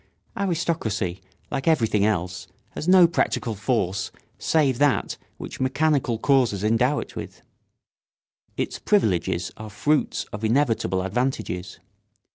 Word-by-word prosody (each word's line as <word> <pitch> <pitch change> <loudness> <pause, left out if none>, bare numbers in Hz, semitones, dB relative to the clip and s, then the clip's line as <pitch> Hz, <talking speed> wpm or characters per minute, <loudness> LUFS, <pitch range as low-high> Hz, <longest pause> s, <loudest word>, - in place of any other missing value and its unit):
] - - -40
Aristocracy, 160 - -1 0.3
like 135 - -3
everything 115 -10 +3
else, 90 -3 -2 0.2
has 155 - -6
no 185 -1 +8
practical 130 -7 0
force 100 -3 -1 0.3
save 140 -6 +2
that 145 -2 +2 0.2
which - - -8
mechanical 135 -2 +1
causes 120 -6 +2
endow 120 +6 +2
it - - -6
with. - - -8 1.1
Its - - -2
privileges 95 - +1
are 110 0 -8
fruits 145 +9 0
of 105 +1 -6
inevitable 110 -6 +1
advantages. 95 -4 -2
120 Hz, 115 wpm, -24 LUFS, 100-145 Hz, 1.1 s, no